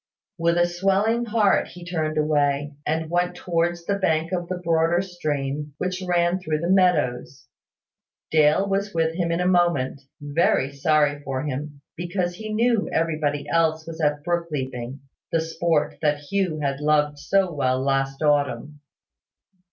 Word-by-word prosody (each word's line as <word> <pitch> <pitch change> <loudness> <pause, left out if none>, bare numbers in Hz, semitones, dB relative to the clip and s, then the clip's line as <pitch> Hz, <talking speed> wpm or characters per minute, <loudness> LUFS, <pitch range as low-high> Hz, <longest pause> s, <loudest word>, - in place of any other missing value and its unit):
With 170 +1 +2
a 175 - +4
swelling 195 +6 +1
heart 215 -3 +2
he 175 -1 -11
turned 155 -3 -2
away, 145 -1 +1
and 160 +1 0
went 175 +2 0
towards 170 -1 -1
the 200 +1 -1
bank 160 -2 +1
of 175 -2 -2
the 185 - -3
broader 165 0 +2
stream 150 -5 -3
which 185 +2 -3
ran 175 0 +1
through 155 -4 -1
the 170 +2 0
meadows. 145 -9 +1 0.9
Dale 155 +5 +4
was 200 -1 -1
with 160 0 +1
him 170 -1 -1
in 170 - 0
a 180 - 0
moment, 170 -7 +2 0.2
very 145 -2 +1
sorry 145 0 +2
for 135 -1 -3
him, 145 0 -5
because 175 +2 -3 0.5
everybody 155 -3 -1
else 160 -1 +1
was 165 0 -7
at 150 -1 +1
brook 175 -1 -1
leaping, 130 -2 -4 0.3
the 165 - +2
sport 160 -2 0
that 150 -1 +2
Hugh 160 +2 -2
had 140 -1 -1
loved 150 -1 +1
so 190 +1 +1
well 130 -3 +1
last 135 +1 -1
autumn. 145 0 0
160 Hz, 150 wpm, -24 LUFS, 145-175 Hz, 0.9 s, a